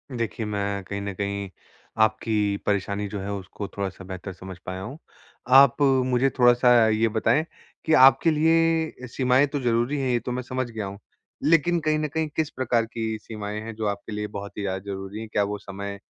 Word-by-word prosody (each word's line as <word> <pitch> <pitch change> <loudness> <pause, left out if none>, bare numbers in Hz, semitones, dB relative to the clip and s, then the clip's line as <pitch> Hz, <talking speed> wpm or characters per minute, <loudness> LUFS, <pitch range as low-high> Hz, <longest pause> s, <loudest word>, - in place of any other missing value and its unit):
देखिए 115 -1 -3
मैं 100 -1 -2
कहीं 100 +2 -5
न 100 0 -4
कहीं 100 0 -3 0.5
आपकी 110 -2 +1
परेशानी 100 0 -1
जो 100 - -5
है 100 +1 -4
उसको 100 +1 -6
थोड़ा-सा 95 -1 -5
बेहतर 95 0 -7
समझ 95 -1 -10
पाया 95 0 -5
हूँ। 125 +9 -7 0.6
आप 140 +1 +7 0.2
मुझे 130 +1 +2
थोड़ा-सा 120 -2 +5
ये 110 +1 +2
बताएँ 115 +8 +2 0.4
कि 160 - +2
आपके 135 +4 +6
लिए 160 -3 +2
सीमाएँ 130 +3 +2
तो 145 0 -3
ज़रूरी 120 +4 +1
हैं, 130 -1 -1
ये 120 - +2
तो 125 - -5
मैं 125 - -2
समझ 130 0 -3
गया 110 -3 -5
हूँ। 100 +1 -7 0.4
लेकिन 165 +2 +3
कहीं 155 -1 +1
न 155 - -1
कहीं 160 +2 -2
किस 160 -1 0
प्रकार 120 -4 0
की 110 -1 -4
सीमाएँ 105 -1 -6
हैं 115 0 -7
जो 110 0 -3
आपके 100 +2 -4
लिए 105 0 -3
बहुत 100 0 -8
ही - - -3
ज़्यादा 95 -1 -2
ज़रूरी 95 +2 -6
है? 110 - -7
क्या 105 -1 +1
वो 105 +1 -3
समय 100 0 -7
110 Hz, 195 wpm, -25 LUFS, 100-130 Hz, 0.6 s, आप